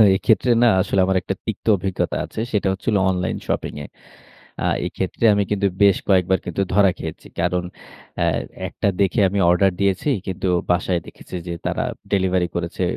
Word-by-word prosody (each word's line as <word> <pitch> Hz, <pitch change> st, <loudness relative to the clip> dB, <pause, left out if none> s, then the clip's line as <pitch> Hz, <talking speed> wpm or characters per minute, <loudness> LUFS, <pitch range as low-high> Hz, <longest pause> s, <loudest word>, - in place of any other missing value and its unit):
এক্ষেত্রে 110 Hz, +4 st, +2 dB
না -, -, +6 dB
আসলে 95 Hz, 0 st, 0 dB
আমার 95 Hz, 0 st, +1 dB
একটা 95 Hz, -, -3 dB
তিক্ত 110 Hz, -2 st, -5 dB
অভিজ্ঞতা 95 Hz, 0 st, -2 dB
আছে। -, -, -8 dB
সেটা 105 Hz, -2 st, 0 dB
হচ্ছে 95 Hz, -, -11 dB
হলো 105 Hz, -3 st, +2 dB
অনলাইন 90 Hz, -1 st, -1 dB
শপিংয়ে। 75 Hz, 0 st, -3 dB, 0.8 s
আ -, -, +1 dB, 0.2 s
এইক্ষেত্রে -, -, -2 dB
আমি 100 Hz, 0 st, +2 dB
কিন্তু 100 Hz, -1 st, +2 dB, 0.2 s
বেশ 100 Hz, -2 st, +5 dB
কয়েকবার 95 Hz, -1 st, +3 dB
কিন্তু 90 Hz, +3 st, -2 dB
ধরা 100 Hz, -2 st, +5 dB
খেয়েছি। 80 Hz, -1 st, -7 dB
কারণ, 90 Hz, +1 st, 0 dB, 0.6 s
অ্যা -, -, +2 dB, 0.4 s
একটা -, -, -2 dB
দেখে 100 Hz, +4 st, +2 dB
আমি 100 Hz, +2 st, -1 dB
অর্ডার 95 Hz, +2 st, +4 dB
দিয়েছি, 100 Hz, +8 st, +1 dB, 0.2 s
কিন্তু 95 Hz, 0 st, -3 dB, 0.2 s
বাসায় 90 Hz, 0 st, +1 dB
দেখেছি -, -, -11 dB
যে 85 Hz, -, -3 dB
তারা -, -, -1 dB, 0.3 s
ডেলিভারি 95 Hz, -2 st, +2 dB
করেছে 85 Hz, +1 st, -2 dB
95 Hz, 165 wpm, -21 LUFS, 90-100 Hz, 0.8 s, না